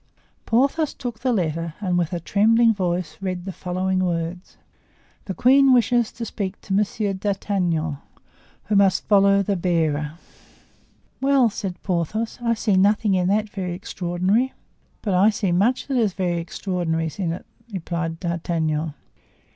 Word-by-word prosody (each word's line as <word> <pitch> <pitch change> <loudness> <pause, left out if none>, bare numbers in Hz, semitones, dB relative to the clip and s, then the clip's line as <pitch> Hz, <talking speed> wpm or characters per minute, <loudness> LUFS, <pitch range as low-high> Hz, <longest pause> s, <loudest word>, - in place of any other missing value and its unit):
Porthos 275 +6 +2
took 240 -3 -6
the 255 - 0
letter 165 -5 -1
and 185 -4 -1
with 175 -2 0
a 175 - -2
trembling 225 +6 +4
voice 175 -5 -2
read 185 -2 -3
the 195 - -4
following 185 +1 -2
words: 175 0 -3 0.7
"The 190 - -4
queen 270 +2 +5
wishes 240 -1 +3
to 230 - -5
speak 200 -2 -4
to 195 - -4
Monsieur 205 0 0
d'Artagnan, 185 -6 -1 0.7
who 210 - -1
must 195 -1 +3
follow 200 -1 +5
the 200 +1 0
bearer." 160 -4 0 1.1
"Well!" 270 -1 +4
exclaimed 195 -4 -3
Porthos; 195 +7 -2
"I 230 -1 +1
see 210 -3 +1
nothing 205 +2 +3
in 180 -1 +2
that 210 +2 +1
very 190 -4 -4
extraordinary." 185 +7 -1 0.5
"But 200 - 0
I 190 +4 +5
see 210 -4 -1
much 210 +9 +2
that 270 -2 -1
is 215 -6 +2
very 175 -3 -1
extraordinary 165 -2 -2
in 175 -4 0
it," 170 - -6 0.3
replied 170 -3 -3
D'Artagnan. 160 -3 -2
190 Hz, 145 wpm, -23 LUFS, 175-215 Hz, 1.1 s, queen